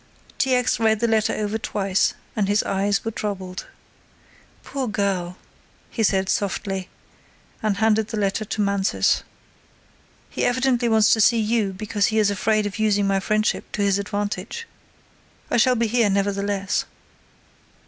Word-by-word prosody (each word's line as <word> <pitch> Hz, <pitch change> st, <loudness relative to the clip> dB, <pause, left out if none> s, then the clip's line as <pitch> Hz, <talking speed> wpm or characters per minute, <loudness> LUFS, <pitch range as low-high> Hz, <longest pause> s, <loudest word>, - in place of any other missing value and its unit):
T. 265 Hz, -1 st, +3 dB
X. 250 Hz, -1 st, +1 dB
read 220 Hz, -1 st, +2 dB
the 235 Hz, -, +1 dB
letter 220 Hz, -1 st, +2 dB
over 215 Hz, +1 st, -2 dB
twice 195 Hz, -3 st, 0 dB, 0.2 s
and 210 Hz, -3 st, +1 dB
his 205 Hz, +1 st, +2 dB
eyes 200 Hz, +2 st, 0 dB
were 225 Hz, -, -1 dB
troubled. 190 Hz, -4 st, -5 dB, 1.0 s
"Poor 270 Hz, -2 st, -4 dB
girl," 195 Hz, -4 st, -1 dB, 0.5 s
he 230 Hz, -, -3 dB
said 190 Hz, -2 st, +2 dB
softly, 195 Hz, -1 st, -2 dB, 0.7 s
and 215 Hz, -2 st, 0 dB
handed 220 Hz, 0 st, +2 dB
the 225 Hz, -, -5 dB
letter 200 Hz, +1 st, 0 dB
to 215 Hz, 0 st, -3 dB
Mansus. 200 Hz, -1 st, +1 dB, 1.1 s
"He -, -, -2 dB
evidently 245 Hz, -1 st, +2 dB
wants 220 Hz, -1 st, +4 dB
to 220 Hz, -, +4 dB
see 235 Hz, +2 st, +4 dB
you 215 Hz, -2 st, +1 dB
because 205 Hz, +1 st, -1 dB
he 220 Hz, -, -1 dB
is 210 Hz, -2 st, +3 dB
afraid 215 Hz, +1 st, +1 dB
of 205 Hz, +1 st, -5 dB
using 205 Hz, -2 st, +2 dB
my 195 Hz, 0 st, +2 dB
friendship 215 Hz, +2 st, -1 dB
to 205 Hz, -, 0 dB
his 200 Hz, 0 st, +2 dB
advantage. 205 Hz, -, -4 dB, 0.9 s
I -, -, +2 dB
shall 250 Hz, +2 st, +4 dB
be 235 Hz, 0 st, +1 dB
here, 230 Hz, -1 st, +2 dB
nevertheless." 200 Hz, 0 st, 0 dB
210 Hz, 150 wpm, -23 LUFS, 200-220 Hz, 1.1 s, wants